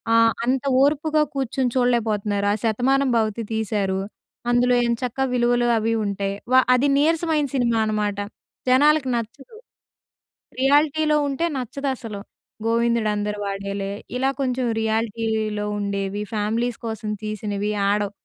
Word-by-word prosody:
ఆహ్, 230 Hz, 0 st, +5 dB
అంత 260 Hz, +1 st, +1 dB, 0.2 s
ఓర్పుగా 305 Hz, +2 st, +2 dB
కూర్చొని 265 Hz, -1 st, -1 dB
చూడలేకపోతున్నారు 215 Hz, -5 st, +1 dB
ఆ -, -, +1 dB
శతమానంభవతి 235 Hz, -2 st, +1 dB
తీశారు. 200 Hz, -3 st, -1 dB, 0.5 s
అందులో 245 Hz, +1 st, +3 dB
ఏం 235 Hz, 0 st, +1 dB
చక్క 250 Hz, +1 st, -3 dB
విలువలు 240 Hz, 0 st, +2 dB
అవి 225 Hz, +1 st, 0 dB
ఉంటాయి. 200 Hz, -1 st, -2 dB, 0.2 s
వా 260 Hz, -, +7 dB
అది 250 Hz, +3 st, +3 dB
నీరసమైన 315 Hz, 0 st, +2 dB
సినిమా 240 Hz, -4 st, +1 dB
అనమాట. 210 Hz, -2 st, -1 dB, 0.5 s
జనాలకి 285 Hz, +2 st, +4 dB
నచ్చదు. 235 Hz, -, -6 dB, 1.0 s
రియాలిటీలో 300 Hz, +3 st, +3 dB
ఉంటే 280 Hz, +4 st, -1 dB
నచ్చదసలు. 255 Hz, -4 st, -4 dB, 0.5 s
గోవిందుడు 230 Hz, -1 st, +2 dB
అందరూ 210 Hz, 0 st, -2 dB
వాడేలే 195 Hz, 0 st, -3 dB, 0.3 s
ఇలా 265 Hz, +2 st, +1 dB
కొంచెం 255 Hz, -1 st, 0 dB
రియాలిటీలో 220 Hz, -1 st, -1 dB
ఉండేవి 200 Hz, 0 st, -2 dB
ఫ్యామిలీస్ 225 Hz, +3 st, -1 dB
కోసం 220 Hz, -1 st, -4 dB
తీసినవి 210 Hz, -1 st, -3 dB, 0.2 s
ఆడవు. 205 Hz, 0 st, +1 dB
230 Hz, 115 wpm, -23 LUFS, 210-260 Hz, 1.0 s, వా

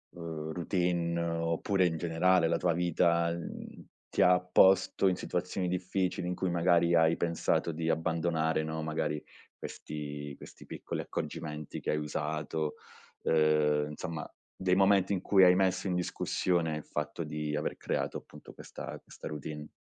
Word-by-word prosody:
uhm, 80 Hz, -2 st, -5 dB
routine 85 Hz, -1 st, 0 dB
oppure 85 Hz, +3 st, +1 dB
in 80 Hz, -2 st, 0 dB
generale 85 Hz, +1 st, +3 dB
la -, -, +1 dB
tua 90 Hz, -2 st, +1 dB
vita, 85 Hz, 0 st, +2 dB
mhmm, 85 Hz, 0 st, -7 dB, 0.2 s
ti -, -, 0 dB
ha 90 Hz, 0 st, +6 dB
posto 95 Hz, +2 st, +4 dB
in 95 Hz, -, +3 dB
situazioni 90 Hz, +1 st, -2 dB
difficili 90 Hz, 0 st, -1 dB
in 90 Hz, -, -1 dB
cui 95 Hz, -, -1 dB
magari 85 Hz, 0 st, +3 dB
hai 80 Hz, 0 st, +4 dB
pensato 85 Hz, 0 st, 0 dB
di 80 Hz, +1 st, -2 dB
abbandonare, 80 Hz, -1 st, +1 dB
no, 80 Hz, 0 st, -3 dB
magari 75 Hz, -1 st, -2 dB, 0.4 s
questi 75 Hz, -1 st, -6 dB
questi -, -, -13 dB
piccoli -, -, -5 dB
accorgimenti 75 Hz, -2 st, -5 dB
che -, -, -2 dB
hai 75 Hz, -, +1 dB
usato, 75 Hz, +1 st, -2 dB, 0.5 s
uhm, 75 Hz, -1 st, +3 dB
insomma 80 Hz, +1 st, -5 dB, 0.3 s
dei 95 Hz, -1 st, +2 dB
momenti 95 Hz, 0 st, +4 dB
in 95 Hz, -, -1 dB
cui 95 Hz, -2 st, +5 dB
hai 90 Hz, -, +8 dB
messo 95 Hz, 0 st, +1 dB
in 90 Hz, -, 0 dB
discussione 85 Hz, -2 st, 0 dB
il 75 Hz, -, -7 dB
fatto 75 Hz, +2 st, -3 dB
di 75 Hz, 0 st, -3 dB
aver 75 Hz, -, -2 dB
creato -, -, -2 dB
appunto -, -, -13 dB
questa -, -, -8 dB
questa -, -, -10 dB
routine? 75 Hz, 0 st, -6 dB
85 Hz, 150 wpm, -31 LUFS, 75-90 Hz, 0.5 s, hai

